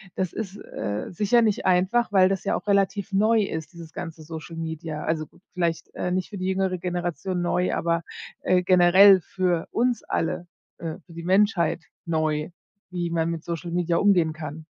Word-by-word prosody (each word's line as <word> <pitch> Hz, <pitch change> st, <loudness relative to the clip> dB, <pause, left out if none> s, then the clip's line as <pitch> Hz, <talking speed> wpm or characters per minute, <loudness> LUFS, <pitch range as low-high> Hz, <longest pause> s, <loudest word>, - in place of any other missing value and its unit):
Das 185 Hz, -3 st, -1 dB
ist, 205 Hz, -3 st, -5 dB
äh, 105 Hz, -, -4 dB
sicher 210 Hz, +6 st, +3 dB
nicht 215 Hz, -3 st, +1 dB
einfach, 190 Hz, +6 st, +2 dB
weil 185 Hz, -1 st, +6 dB
das 190 Hz, -1 st, -2 dB
ja -, -, +1 dB
auch -, -, -5 dB
relativ 200 Hz, 0 st, +1 dB
neu 215 Hz, +3 st, +3 dB
ist, 160 Hz, -3 st, -5 dB
dieses 170 Hz, -2 st, -10 dB
ganze 165 Hz, -2 st, -7 dB
Social 160 Hz, +1 st, -8 dB
Media. 160 Hz, -1 st, -5 dB
Also, 160 Hz, -1 st, -1 dB, 0.3 s
vielleicht, 170 Hz, -2 st, -2 dB
äh, 180 Hz, -, -2 dB
nicht 185 Hz, 0 st, -1 dB
für 205 Hz, -, -7 dB
die 185 Hz, -, -3 dB
jüngere 190 Hz, -1 st, 0 dB
Generation 175 Hz, +1 st, -2 dB
neu, 180 Hz, +1 st, 0 dB
aber, 170 Hz, 0 st, 0 dB, 0.4 s
äh, 180 Hz, 0 st, +2 dB
generell 185 Hz, +2 st, +7 dB
für 180 Hz, -1 st, -1 dB
uns 240 Hz, -1 st, +1 dB
alle, 170 Hz, +1 st, -2 dB, 0.3 s
äh 165 Hz, -2 st, -5 dB
für 180 Hz, -, -17 dB
die 170 Hz, 0 st, -7 dB
Menschheit 185 Hz, -3 st, +2 dB, 0.2 s
neu, 155 Hz, -1 st, -1 dB, 0.4 s
wie 175 Hz, -2 st, -3 dB
man 165 Hz, -1 st, 0 dB
mit 165 Hz, -1 st, -5 dB
Social 170 Hz, 0 st, -5 dB
Media 175 Hz, -1 st, +1 dB
umgehen 180 Hz, -6 st, +4 dB
kann. 155 Hz, 0 st, -7 dB
175 Hz, 180 wpm, -25 LUFS, 165-190 Hz, 0.4 s, generell